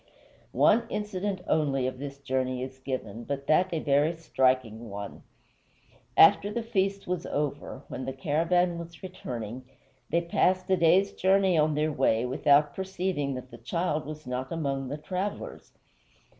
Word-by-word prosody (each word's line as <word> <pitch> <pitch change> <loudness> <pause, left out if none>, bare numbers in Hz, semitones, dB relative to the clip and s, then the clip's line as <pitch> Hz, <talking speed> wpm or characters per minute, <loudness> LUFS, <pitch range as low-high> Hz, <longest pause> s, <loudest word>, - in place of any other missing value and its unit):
One 230 +2 +4
incident 200 -2 -3
only 140 -4 +1
of 130 0 -3
this 140 0 -6
journey 130 -2 -2
is 130 0 -8
given, 120 -4 -5
but 140 +2 -4
that 180 +5 +3
a 165 - -1
very 145 +1 +2
striking 130 -7 0
one. 100 0 -7 1.0
After 205 - +7
the 235 +2 -2
feast 195 -3 -1
was 180 -1 -3
over, 145 -1 -3
when 130 - -6
the 135 - -3
caravan 170 +5 +1
was 170 +2 -10
returning, 125 - -6 0.5
they 170 - +2
passed 185 +2 +1
a - - +6
day's 180 +4 +4
journey 190 -1 +3
on 155 -1 +3
their 155 +1 +1
way 125 -4 +2
without 145 +3 +3
perceiving 185 -7 -2
that 130 0 -8
the 120 - -11
child 155 +4 -2
was 155 -1 -8
not 125 +1 -4
among 140 -5 -2
the 145 +3 -4
travelers. 185 +6 -5
150 Hz, 155 wpm, -28 LUFS, 130-180 Hz, 1.0 s, After